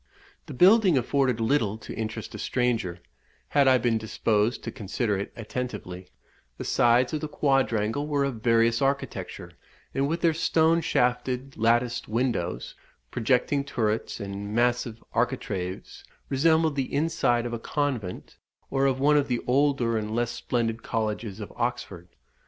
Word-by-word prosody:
The 145 - -7
building 190 - +6
afforded 130 -1 +1
little 110 -3 +1
to - - -9
interest 110 0 -5
a - - -7
stranger, 115 -9 -1 0.5
had 140 -2 +3
I 130 -1 +6
been 115 -2 +1
disposed 110 +1 0
to - - -4
consider 105 0 -2
it 100 +1 -4
attentively; 105 -6 -6 0.5
the - - -5
sides 120 +2 +3
of 155 - -1
the 155 - -3
quadrangle 135 -3 +1
were 145 -2 +1
of 130 -5 -3
various 115 0 +3
architecture, 140 +1 -2 0.4
and 135 +1 +1
with 165 +3 -2
their 165 -2 +3
stone 165 +1 +2
shafted 125 -1 0
latticed 120 +2 +1
windows, 110 -7 -2 0.4
projecting 125 +4 +1
turrets, 110 -7 -2
and 100 +1 -5
massive 120 -1 0
architraves, 110 -6 -3 0.3
resembled 160 +2 +3
the 135 -2 -2
inside 140 -6 +1
of 120 - -4
a 120 - -3
convent, 125 -9 -3 0.3
or 135 0 +2
of 130 -1 0
one 150 +2 +4
of 145 -1 +2
the 120 -2 -1
older 130 -3 +2
and 110 +1 -4
less 120 0 0
splendid 120 -1 -2
colleges 110 -2 -3
of 105 - -8
Oxford. 100 -7 -3
120 Hz, 145 wpm, -26 LUFS, 110-140 Hz, 0.5 s, building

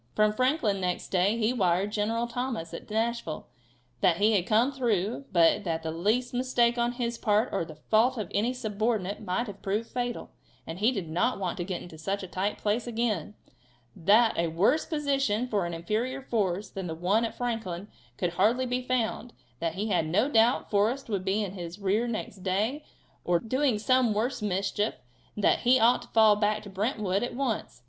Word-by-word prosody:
From 215 0 +3
Franklin 255 -5 +1
next 180 -1 -2
day 195 +4 +2
he 230 +1 +1
wired 190 -2 +1
General 225 +3 0
Thomas 240 -8 -4
at - - -8
Nashville 225 -6 -2 0.5
that 170 +5 +3
he 210 +3 +4
had 190 -4 +1
come 230 +5 +3
through, 235 -2 -1
but 170 +1 +4
that 165 -3 -2
the 160 - -2
least 215 +10 0
mistake 245 -1 +2
on 240 +1 +1
his 235 -1 -3
part, 215 +3 +2
or 195 - 0
the 160 -1 -9
fault 225 +11 +2
of 215 -4 -3
any 220 +5 +1
subordinate, 215 -4 -2
might 195 +3 -1
have 205 -3 -9
proved 210 +4 -2
fatal, 245 -1 -3 0.3
and 165 +2 -7
he 220 +5 +3
did 195 -9 -4
not 175 +10 0
want 185 -3 -2
to 175 - -2
get 180 -1 -4
into 160 -3 -11
such 195 +5 -2
a - - -5
tight 190 +3 -2
place 215 +4 -1
again; 220 -5 -2 0.6
that 215 +6 +4
a 170 - +2
worse 195 - +2
position 275 -7 0
for 200 -7 0
an 170 - -5
inferior 230 +10 -2
force 205 -5 -1
than 190 -3 -5
the 160 - -4
one 190 +7 +1
at 230 - -3
Franklin 220 -6 -3 0.3
could 175 - -1
hardly 220 +9 +2
be 250 0 -1
found; 245 -1 -2 0.3
that 165 -1 -2
he 210 +3 -2
had 175 -5 +1
no 205 +10 +2
doubt 235 -2 +3
Forrest 225 +6 +1
would 200 -4 -1
be 195 +3 0
in 195 - -4
his 175 -2 -7
rear 210 +4 0
next 220 -3 -4
day, 205 +10 -1 0.4
or 175 0 +2
doing 255 +2 +1
some 240 0 +2
worse 245 +3 -1
mischief, 200 +1 -1 0.4
and 210 - -5
that - - +4
he 250 +1 +4
ought 235 +2 +4
to - - -12
fall 220 -2 +5
back 210 0 0
to 205 - -10
Brentwood 205 -1 -1
at 245 - -3
once. 250 - -2
215 Hz, 200 wpm, -28 LUFS, 190-240 Hz, 0.6 s, fall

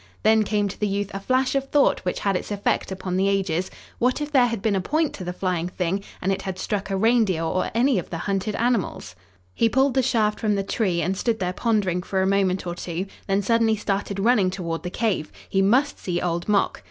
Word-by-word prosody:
Then 220 0 +5
came 210 -1 +1
to 195 - -8
the 210 - +1
youth 200 0 -2
a 195 - -3
flash 255 +5 +1
of 275 0 -1
thought 290 -1 +3
which 180 - -3
had 200 -1 +1
its - - -3
effect 205 -1 -1
upon 185 -1 -3
the 195 +1 +2
ages: 185 -3 0 0.3
"What 250 +3 +2
if 295 0 -4
there 255 -4 +5
had 230 -2 -2
been 205 0 +1
a 190 - +1
point 310 - 0
to 185 - -7
the 180 - -3
flying 180 -2 -2
thing 185 +2 -2 0.2
and 190 - +1
it 190 - -1
had 190 -2 -5
struck 200 0 -3
a 195 - 0
reindeer 215 -6 +2
or 185 +3 0
any 245 -2 +3
of - - -7
the 170 - -4
hunted 200 +3 -2
animals?" 235 - -1 0.4
He 230 - +2
pulled 265 +3 +2
the 265 - +3
shaft 220 -4 +1
from 210 -2 +1
the 195 - 0
tree 190 -5 0
and 185 +4 0
stood 225 +3 0
there 180 -3 -2
pondering 200 -5 0
for 190 +1 -1
a - - +1
moment 190 -2 +1
or 175 - -3
two, 175 +1 -4 0.2
then 195 +1 +1
suddenly 230 +1 +3
started 200 -1 -2
running 210 -3 +3
toward 170 -3 -4
the 180 - -4
cave. 185 -6 -1 0.2
He 195 - +1
must 255 +9 +2
see 175 -2 -2
Old 175 +2 -2
Mok! 205 -1 +2
200 Hz, 240 wpm, -24 LUFS, 185-225 Hz, 0.4 s, Then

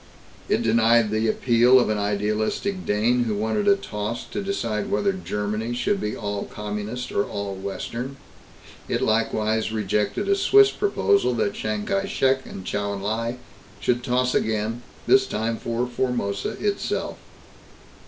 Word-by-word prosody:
It 115 - +2
denied 115 -1 +4
the 110 +1 +1
appeal 120 +3 +5
of 120 - +1
an 105 -1 0
idealistic 105 - -1
Dane 120 +4 +2
who 110 -2 -1
wanted 110 - 0
a 200 - +7
toss 110 - -4
to - - -2
decide 195 - -2
whether 200 0 +1
Germany 110 - -3
should 195 +11 0
be 105 - -2
all 100 -1 -3
Communist 105 +4 -5
or 100 - +1
all 100 -1 -4
Western. 115 +7 -5 0.7
It - - 0
likewise 110 0 +1
rejected 105 - -1
a 200 - +4
Swiss 405 - +6
proposal 200 - +2
that 105 -3 0
Chiang 105 -1 -3
Kai 195 0 0
Shek 130 -6 +1
and 95 - -8
Chou 100 0 -2
En 100 - -5
Lai 115 +4 -2 0.4
should 120 0 0
toss 125 0 +1
again, 110 +2 0 0.2
this 395 0 +5
time 115 0 -2
for 120 +2 -2
Formosa 120 -5 -2
itself. 205 - -2
115 Hz, 150 wpm, -24 LUFS, 105-130 Hz, 0.7 s, a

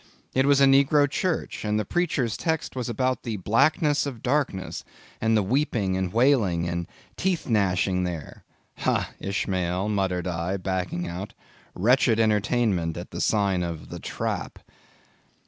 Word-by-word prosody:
It 130 +1 +2
was 140 -1 +5
a 140 - +7
negro 140 +2 +5
church; 170 +4 -2
and 105 0 0
the 105 - -2
preacher's 140 - 0
text 160 -4 -2
was 125 -1 -3
about 130 +3 0
the 115 -3 -4
blackness 145 - +2
of 125 -5 -7
darkness, 125 -8 -1 0.4
and 110 0 +3
the 105 - +2
weeping 110 -4 0
and 95 -1 -1
wailing 110 -9 +2
and 85 0 -3 0.3
teeth 185 -3 -1
gnashing 95 -4 +1
there. 85 -5 -6 0.4
Ha, - - 0
Ishmael, 95 -1 -1
muttered 95 -4 0
I, 90 +2 -2
backing 90 -2 -2
out, 90 +4 -6 0.4
Wretched 115 +2 +3
entertainment 105 -6 +1
at - - -7
the - - -4
sign 100 -4 +2
of 85 -2 -5
'The - - -7
Trap! - - -4
105 Hz, 145 wpm, -25 LUFS, 90-130 Hz, 0.4 s, a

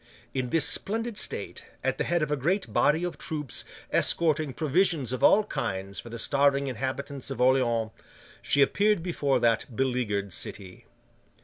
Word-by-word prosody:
In 130 -2 -2
this 165 +2 +3
splendid 225 +2 +1
state, - - -1 0.2
at - - -1
the - - +1
head 175 -2 0
of 150 - -3
a - - +2
great 175 +9 -2
body 155 +4 +2
of 175 - -4
troops 150 -5 -1 0.3
escorting 155 -3 +2
provisions 155 -1 0
of 130 - -4
all 215 - +6
kinds 100 - -4
for 120 - -9
the 115 - -7
starving 140 +2 +2
inhabitants 135 +2 -4
of - - -6
Orleans, 120 -3 +2 0.5
she 140 - +3
appeared 205 +3 +1
before 145 -7 0
that 115 +1 0
beleaguered 110 -7 -1
city. 100 +7 -6
140 Hz, 155 wpm, -27 LUFS, 120-160 Hz, 0.5 s, all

